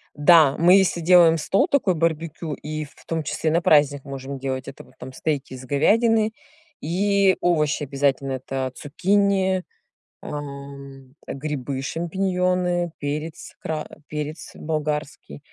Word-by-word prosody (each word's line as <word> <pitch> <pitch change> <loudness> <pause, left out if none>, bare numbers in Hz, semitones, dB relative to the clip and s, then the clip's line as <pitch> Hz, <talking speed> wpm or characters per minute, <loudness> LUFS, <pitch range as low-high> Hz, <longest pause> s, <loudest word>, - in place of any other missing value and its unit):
да, 150 -2 +6
мы 175 +3 +6
если 190 -3 +2
делаем 170 -1 +6
стол 195 - +2
такой 260 - +2
барбекю 165 -1 -2
и 155 +1 -5
в 145 - -18
том 160 -1 -2
числе 155 +2 -1
на 165 +2 +2
праздник 145 -2 +3
можем 135 0 -6
делать, 130 -1 -4
это, - - -9
вот, - - -21
там, 130 +1 -8
стейки 140 -1 -3
из 130 0 -9
говядины 220 - +2 0.5
и 195 +3 +2
овощи 155 -4 +1
обязательно- 135 -1 0
это 130 0 -3
цукини, 190 +3 +1 0.6
ам, 140 -2 -9
грибы 140 -2 -4
шампиньоны, 180 +2 -1
перец 150 +2 -5
кра 155 -1 -4 0.2
перец 150 +1 -6
болгарский. 150 - -4
155 Hz, 130 wpm, -23 LUFS, 140-175 Hz, 0.6 s, да